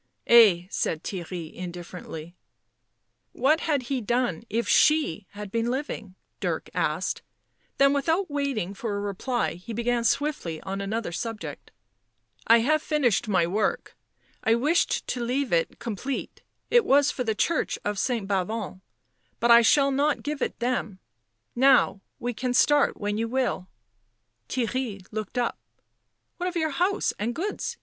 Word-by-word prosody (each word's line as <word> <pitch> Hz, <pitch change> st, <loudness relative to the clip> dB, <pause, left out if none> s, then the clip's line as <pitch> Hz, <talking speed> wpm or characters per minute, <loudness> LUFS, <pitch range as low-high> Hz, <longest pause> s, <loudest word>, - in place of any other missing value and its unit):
" -, -, -43 dB
Ay," 205 Hz, -7 st, +7 dB
said 160 Hz, 0 st, -1 dB
Theirry 175 Hz, -3 st, -6 dB
indifferently. 175 Hz, -2 st, -8 dB, 1.0 s
"What 290 Hz, +6 st, +3 dB
had 290 Hz, -6 st, 0 dB
he 255 Hz, +1 st, -2 dB
done 235 Hz, -5 st, 0 dB
if 230 Hz, +3 st, -1 dB
she 295 Hz, -, +3 dB
had 205 Hz, -1 st, -7 dB
been 230 Hz, +1 st, 0 dB
living?" 245 Hz, -7 st, -4 dB, 0.2 s
Dirk -, -, -3 dB
asked, -, -, -1 dB, 0.6 s
then 275 Hz, 0 st, +5 dB
without 320 Hz, +7 st, +1 dB
waiting 275 Hz, -, -2 dB
for 205 Hz, +1 st, -4 dB
a -, -, -2 dB
reply 205 Hz, +4 st, -1 dB
he 180 Hz, +7 st, -8 dB
began 235 Hz, +1 st, 0 dB
swiftly 230 Hz, -, 0 dB
on 195 Hz, +1 st, -4 dB
another 210 Hz, 0 st, -3 dB
subject. 225 Hz, +4 st, -6 dB, 0.4 s
" -, -, -50 dB, 0.3 s
I 230 Hz, 0 st, +7 dB
have 310 Hz, +5 st, +2 dB
finished 275 Hz, -, +1 dB
my 185 Hz, -5 st, +3 dB
work. 205 Hz, +5 st, -1 dB, 0.5 s
I 225 Hz, -, +4 dB
wished 300 Hz, +8 st, +1 dB
to 245 Hz, -, -3 dB
leave 255 Hz, -1 st, -1 dB
it 165 Hz, -1 st, +1 dB
com 230 Hz, -3 st, -4 dB
plete 265 Hz, +6 st, -5 dB, 0.2 s
— -, -, -46 dB
it 480 Hz, -1 st, +6 dB
was 285 Hz, +1 st, +4 dB
for 250 Hz, -, -3 dB
the 220 Hz, -2 st, -1 dB
church 335 Hz, +8 st, 0 dB
of 205 Hz, -1 st, -1 dB
St. 230 Hz, -3 st, -1 dB
Bavon, 195 Hz, 0 st, -2 dB, 0.6 s
but 235 Hz, +1 st, +3 dB
I 235 Hz, 0 st, +9 dB
shall 275 Hz, +4 st, +4 dB
not 285 Hz, +2 st, +1 dB
give 295 Hz, -1 st, -3 dB
it -, -, -2 dB
them. 240 Hz, -5 st, -2 dB, 0.6 s
Now, 260 Hz, -5 st, +4 dB, 0.2 s
we 245 Hz, +1 st, -3 dB
can 250 Hz, +2 st, -2 dB
start 290 Hz, +2 st, +4 dB
when 205 Hz, +1 st, -2 dB
you 230 Hz, -, 0 dB
will." 245 Hz, -7 st, -1 dB, 0.8 s
Theirry 235 Hz, -5 st, -2 dB
looked 215 Hz, +2 st, -5 dB
up. 240 Hz, -1 st, 0 dB, 0.4 s
" -, -, -51 dB
What 360 Hz, +1 st, -1 dB
of 360 Hz, -, -10 dB
your 315 Hz, -2 st, 0 dB
house 370 Hz, +8 st, +1 dB
and 230 Hz, +3 st, -2 dB
goods?" 405 Hz, +5 st, -3 dB
235 Hz, 160 wpm, -26 LUFS, 200-275 Hz, 1.0 s, I